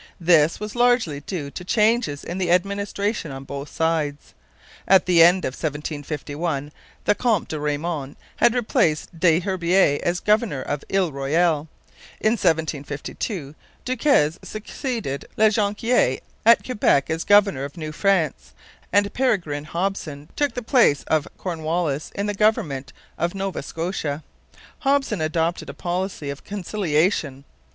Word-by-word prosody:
This 165 -2 +4
was 210 0 -5
largely 240 - +2
due 145 -2 -5
to 180 - -7
changes 215 - +1
in 175 +2 -5
the 180 -2 0
administration 200 +1 0
on 135 0 -7
both 140 +1 -7
sides. 160 -3 -1 0.5
At 190 -1 +6
the 175 -2 +5
end 180 +3 +6
of 130 - -2
1751 150 0 -4 0.3
the - - +4
Count 220 -4 0
de 155 - -3
Raymond 150 -1 -3 0.2
had 240 - +4
replaced 170 -8 0
Des 170 0 +4
Herbiers 180 -4 +2
as 175 +1 0
governor 210 - +1
of 145 -1 -3
Ile 190 -4 +2
Royale; 150 +3 +1 0.5
in 215 - +2
1752 160 - -2 0.3
Duquesne 240 - +2
succeeded 215 - -4
La 220 0 +6
Jonquiere 210 - +1 0.3
at 230 - +6
Quebec 205 - +2
as 160 +1 -1
governor 205 -9 +4
of 140 +4 -7
New 155 -2 -5
France; 155 - 0 0.4
and 200 +1 +2
Peregrine 170 - 0
Hopson 165 -4 -3
took 290 -1 0
the 245 - -4
place 230 - +3
of 155 -2 0
Cornwallis 160 -4 -2
in 200 - -1
the 205 - -1
government 160 -11 0 0.3
of 170 +2 -1
Nova 195 -1 -3
Scotia. 160 -3 -3 0.6
Hopson 270 - +1
adopted 165 +2 -1
a - - -7
policy 175 -4 -3
of 140 - -9
conciliation. 175 -7 -1
170 Hz, 135 wpm, -23 LUFS, 150-205 Hz, 0.6 s, At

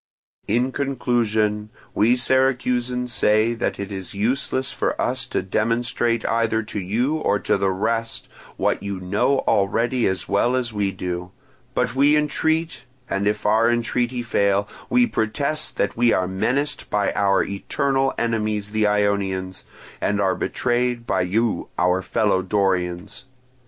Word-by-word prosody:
"In 125 +2 +1
conclusion, 110 -6 0 0.2
we 115 +4 +3
Syracusans 125 -1 +1
say 110 +2 +3
that 115 - -2
it 100 +1 -5
is 95 -1 -6
useless 130 +4 -1
for - - -2
us - - -1
to - - -2
demonstrate 115 +3 0
either 115 -1 +1
to 105 0 -5
you 120 +11 0
or 105 - +1
to - - 0
the 100 -1 +1
rest 115 +4 -2 0.3
what - - 0
you 100 -1 -4
know 100 +9 +1
already 115 +5 +1
as 95 -1 -2
well 120 +5 +2
as 120 -3 -2
we 100 -2 0
do; 90 -1 -4 0.5
but 115 - 0
we 145 +3 +4
entreat, 160 -2 0 0.2
and 100 +1 -1
if 105 - -1
our 110 +2 +4
entreaty 120 +1 0
fail, 100 -3 +1 0.2
we 250 0 +4
protest 150 - -1
that 100 - 0
we 120 0 +3
are 90 - +1
menaced 130 +10 -1
by 105 -1 +1
our 100 -1 +2
eternal 135 +7 0
enemies 110 -3 -1
the 110 -1 +2
Ionians, 100 -3 0 0.4
and 100 0 0
are 95 -2 +2
betrayed 120 +3 -1
by 95 - +1
you 110 +5 0
our 90 +1 +2
fellow 100 0 +1
Dorians. 95 0 -1
110 Hz, 145 wpm, -22 LUFS, 100-125 Hz, 0.5 s, we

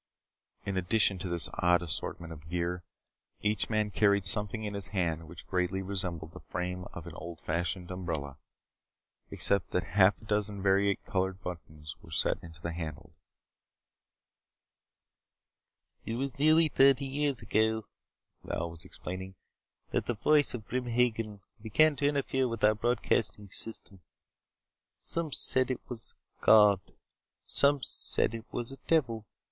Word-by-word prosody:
In 100 -1 -2
addition 95 +1 +2
to 90 - -4
this 85 -3 +2
odd 90 0 +4
assortment 85 0 -3
of 80 0 -13
gear, 90 +1 -1 0.6
each 105 +1 0
man 110 -1 +1
carried 100 -1 +3
something 105 +1 +1
in 105 -1 -3
his 100 -2 -1
hand 85 -4 -1
which 85 0 -11
greatly 95 +1 -1
resembled 90 -4 -3
the - - -10
frame 90 0 -4
of 85 - -8
an 85 - -8
old 85 0 -8
fashioned 85 +2 -2
umbrella 80 -7 -4 0.9
except 100 -3 +2
that 90 - 0
half 95 0 +5
a - - -15
dozen 105 -1 0
vari 100 0 +4
colored 95 -1 -1
buttons 80 -3 -7
were - - -15
set - - +1
into 80 -2 -12
the 85 +1 -4
handles. 80 -4 -6 2.9
"It 115 - -3
was 135 +2 -3
nearly 155 +2 +6
thirty 135 -1 +5
years 140 -2 0
ago," 110 +1 +1 0.6
Val 85 0 -3
was 85 -1 -9
explaining, 95 +1 -7 0.6
"that - - -1
the 120 - 0
voice 145 +5 +3
of 110 -4 -7
Grim 125 0 -2
Hagen 115 -4 0 0.2
began 150 +8 +4
to 140 - +2
interfere 135 -2 +1
with 115 -2 -5
our 105 +1 +6
broadcasting 110 -3 0
system. 100 -4 -6 1.0
Some 165 -2 -3
said 130 -1 +1
it 130 - -4
was 120 -2 -5
a - - -37
god. 105 -3 +7 0.6
Some 140 -1 +3
said - - 0
it 115 -1 -8
was 120 +1 -3
a 135 - -9
devil. 115 -10 +1
100 Hz, 145 wpm, -30 LUFS, 90-115 Hz, 2.9 s, god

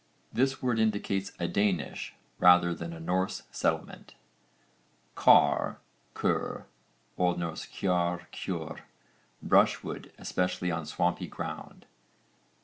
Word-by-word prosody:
This 135 +2 +1
word 120 -3 +1
indicates 100 -3 0
a 85 - -1
Danish 90 -5 -1 0.2
rather 90 -1 +6
than 85 0 -6
a 85 - -8
Norse 90 +3 -1
settlement. - - -2 1.0
CAR(R), - - +5 0.4
ker. - - -1 0.5
O.N. 90 -1 +2
kjarr, 85 +1 -1
kjörr, 85 -5 -4 0.6
brushwood, - - +2
especially 90 0 -1
on 80 -2 -3
swampy 85 +2 0
ground. - - -7
90 Hz, 95 wpm, -29 LUFS, 85-95 Hz, 1.0 s, rather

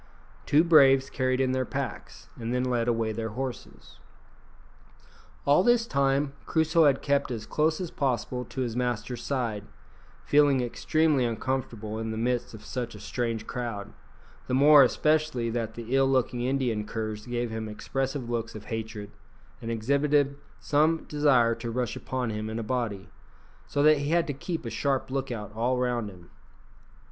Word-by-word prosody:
Two 150 +3 +5
braves 135 -5 +5
carried 130 0 0
in 130 -1 +2
their 130 0 0
packs, - - -6
and 115 0 -5
then 125 0 0
led 120 -2 0
away 115 -2 +1
their 110 +1 -3
horses. 130 -2 -7 1.5
All 145 +5 +5
this 240 +2 +3
time 140 -4 +1
Crusoe 160 0 +3
had 140 -2 +3
kept 140 -1 +1
as 115 -4 -4
close 155 +1 +1
as 180 -3 -4
possible 125 -2 -1
to 130 - -5
his 120 -3 -2
master's 125 -1 -2
side, 115 -7 -2 0.6
feeling 145 -2 +4
extremely 150 +3 +1
uncomfortable 115 -2 -3
in 110 0 -3
the 110 - -4
midst 120 0 -1
of 110 - -13
such 120 -3 -4
a - - -10
strange 115 +1 -3
crowd, 115 -5 -5 0.5
the 130 - 0
more 145 +2 +8
especially 150 -3 +2
that 115 -1 -3
the 120 +2 -3
ill 135 0 +4
looking 125 -2 +1
Indian 125 -4 0
curs 110 0 -5
gave 120 -1 -2
him 110 -1 -4
expressive 135 +4 -3
looks 115 -2 -3
of 105 -1 -9
hatred, 110 -2 -5 0.5
and 115 - -5
exhibited 140 +5 +1 0.2
some 155 +2 +2
desire 135 -6 +3
to 115 +1 -6
rush 120 -1 -2
upon 125 -3 -3
him 105 0 -4
in 110 - -4
a 115 - -3
body, 110 -4 -3 0.6
so 145 - 0
that 155 0 +6
he 145 +1 -2
had 170 +1 +3
to 145 - -3
keep 160 +2 -5
a 115 - -4
sharp 135 -2 -1
look 135 0 -2
out 105 -3 -6
all 120 +3 0
round 120 -3 -1
him. 90 -3 -15
125 Hz, 170 wpm, -27 LUFS, 115-140 Hz, 1.5 s, more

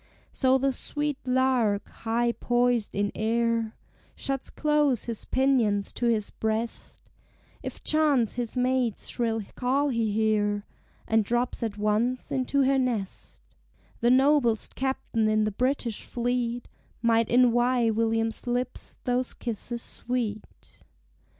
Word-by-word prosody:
So 260 -1 +3
the 270 0 +1
sweet 295 +1 -3
lark, 250 -5 +2
high 235 +1 0
poised 240 -2 +1
in 205 +1 0
air, 230 0 0 0.4
Shuts 270 -1 -3
close 300 -5 +1
his 230 -3 -5
pinions 240 -7 +1
to 240 - -1
his 220 -3 0
breast 220 +1 -3 0.6
If - - -7
chance 295 -7 +3
his 240 0 -4
mate's 250 -3 0
shrill 225 -3 -1
call 275 +4 +1
he 230 -4 0
hear, 205 -1 +1 0.4
And 225 -1 +3
drops 240 +4 -1
at 220 -3 -3
once 215 +4 0
into 270 +1 +1
her 270 0 +3
nest: 230 -7 -3 0.6
The 235 - +3
noblest 260 -3 +3
captain 250 -4 -1
in 215 0 +3
the 215 - 0
British 245 0 -1
fleet 240 0 -2 0.4
Might 230 -1 +3
envy 240 -1 +4
William's 225 +1 0
lips 245 +1 -3
those 250 0 -1
kisses 235 +1 -5
sweet. 230 -4 -5
240 Hz, 125 wpm, -27 LUFS, 220-255 Hz, 0.6 s, envy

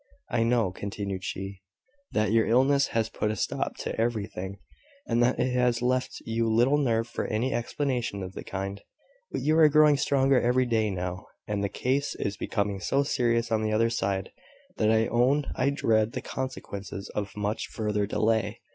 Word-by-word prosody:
"I - - +1
know," 115 -4 +2
continued 100 -1 -5
she, 95 0 -5 0.5
"that 105 -1 +1
your 115 0 +3
illness 135 +4 +4
has 115 -1 0
put 105 - -2
a 110 - -1
stop - - -2
to - - -3
everything; 100 -4 -2 0.5
and 115 - +1
that 125 +1 +2
it 125 0 +1
has 125 -1 +2
left 125 +1 -1
you 115 0 0
little 125 +6 +4
nerve 115 -4 +1
for - - -3
any 120 +5 0
explanation 120 -5 -2
of 95 0 -7
the - - -7
kind: 100 +1 -5 0.5
but - - -2
you 155 +2 +2
are 155 -1 +8
growing 150 -1 +5
stronger 135 -2 +3
every 125 +1 +2
day 110 -3 +1
now, 90 -1 -4 0.2
and 105 -1 -1
the 100 - 0
case 135 +6 -1
is 100 - -2
becoming 100 -1 -2
so 135 +11 +1
serious 120 -4 +1
on 110 -1 +2
the 110 0 0
other 115 +1 +2
side 95 -4 -1 0.5
that 110 - +2
I 110 0 +4
own 130 +6 +2
I 130 - +2
dread 110 -5 +1
the - - -3
consequences 100 -6 -6
of 105 0 -5
much 105 +1 -2
further 105 -2 -1
delay. 110 0 0
115 Hz, 180 wpm, -27 LUFS, 100-125 Hz, 0.5 s, are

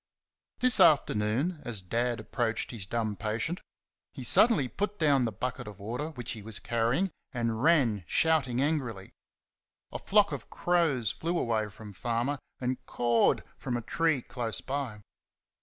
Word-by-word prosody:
This 255 0 +6
afternoon, 135 +3 +3
as 110 -6 -4
Dad 120 +5 -1
approached 115 +1 -2
his 105 -6 -6
dumb 110 -1 -1
patient, 110 - -2 0.5
he - - -7
suddenly 160 - +5
put 205 - -3
down 145 -6 +3
the 115 - -1
bucket 115 +2 -4
of 105 -2 -9
water 120 +9 -4
which 125 -7 -6
he 110 - -6
was 110 0 -1
carrying 120 +11 0 0.2
and 115 -2 -1
ran, 130 - +3
shouting 140 - +2
angrily. 125 -11 -2 0.8
A - - -5
flock 205 0 +3
of - - -6
crows 155 - +1
flew 165 - -2
away 110 -6 0
from 105 +1 -11
Farmer 120 +7 -1 0.2
and 125 0 -2
"cawed" 120 -1 +2 0.2
from 125 -2 -2
a - - -4
tree 155 +2 +1
close 115 -3 -4
by. 130 -7 -4
120 Hz, 150 wpm, -29 LUFS, 110-150 Hz, 0.8 s, This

